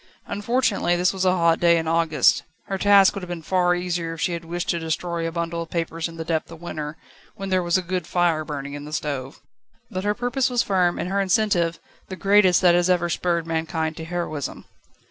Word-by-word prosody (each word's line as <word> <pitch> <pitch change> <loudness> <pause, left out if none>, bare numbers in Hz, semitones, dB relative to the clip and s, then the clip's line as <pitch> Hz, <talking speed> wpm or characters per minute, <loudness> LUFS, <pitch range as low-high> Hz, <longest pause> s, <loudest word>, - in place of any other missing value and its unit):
Unfortunately, 205 -4 0
this 180 +2 +2
was 190 -1 -1
a 185 - +5
hot 170 -1 +3
day 170 -1 +5
in 160 -1 -2
August. 165 -1 +3 0.2
Her 195 -1 -3
task 200 -1 +6
would 200 - -5
have 180 - -8
been 170 -2 -5
far 180 0 +2
easier 175 -2 -2
if 165 - -9
she 180 - +1
had 170 0 -4
wished 170 +1 -4
to 170 - +1
destroy 165 +1 -2
a - - -3
bundle 170 0 -3
of 165 - -7
papers 165 -1 -2
in 165 0 -11
the 160 - -5
depth 160 -1 -2
of 165 - -10
winter, 155 -3 -6 0.4
when 195 0 -6
there 185 -1 +2
was 175 +1 +2
a 185 - -2
good 180 -1 -3
fire 170 -3 +1
burning 145 -2 -6
in 145 0 -7
the 150 - -9
stove. 140 -3 -4 0.5
But 185 0 -3
her 205 +1 0
purpose 245 +2 0
was 245 -1 +1
firm 180 -3 +1
and - - -3
her 200 0 +1
incentive, 185 -4 +1 0.3
the 190 - -6
greatest 195 -2 +4
that 175 -1 +6
has 175 +1 +2
ever 175 -1 +2
spurred 170 -1 0
mankind 160 -1 -2
to 160 - -6
heroism. 165 -4 -4
175 Hz, 225 wpm, -23 LUFS, 165-185 Hz, 0.5 s, task